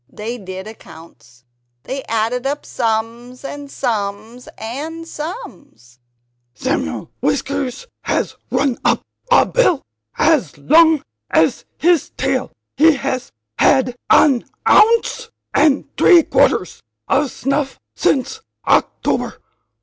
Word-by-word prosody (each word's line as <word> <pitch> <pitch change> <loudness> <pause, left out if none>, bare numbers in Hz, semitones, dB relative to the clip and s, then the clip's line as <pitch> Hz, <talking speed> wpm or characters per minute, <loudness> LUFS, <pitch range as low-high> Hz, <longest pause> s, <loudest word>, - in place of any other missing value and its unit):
They 230 +3 -6
did 190 -1 -7
accounts. 145 - -14 0.4
They 270 +1 -4
added 230 +4 -1
up 290 +1 -3
sums 235 +2 -3
and 285 0 -7
sums, 220 -1 -4
and 310 +9 -6
sums. 295 - -9 0.6
"Samuel 260 - -3
Whiskers 280 - -2 0.2
has - - -1
run 270 -4 0
up - - +2 0.3
a - - +6
bill 425 - +2 0.3
as 300 - +2
long 315 - +5 0.3
as - - +2
his 340 -3 +2
tail; - - -1 0.2
he 320 0 +5
has 265 -2 -3 0.3
had 250 -2 +3
an 270 -6 +5 0.2
ounce 460 +1 +4 0.2
and 290 -1 +3
three 345 -3 +6
quarters - - +1 0.3
of 280 0 +2
snuff 275 +2 -2
since 375 - 0 0.2
October. - - 0
270 Hz, 105 wpm, -18 LUFS, 225-300 Hz, 0.6 s, a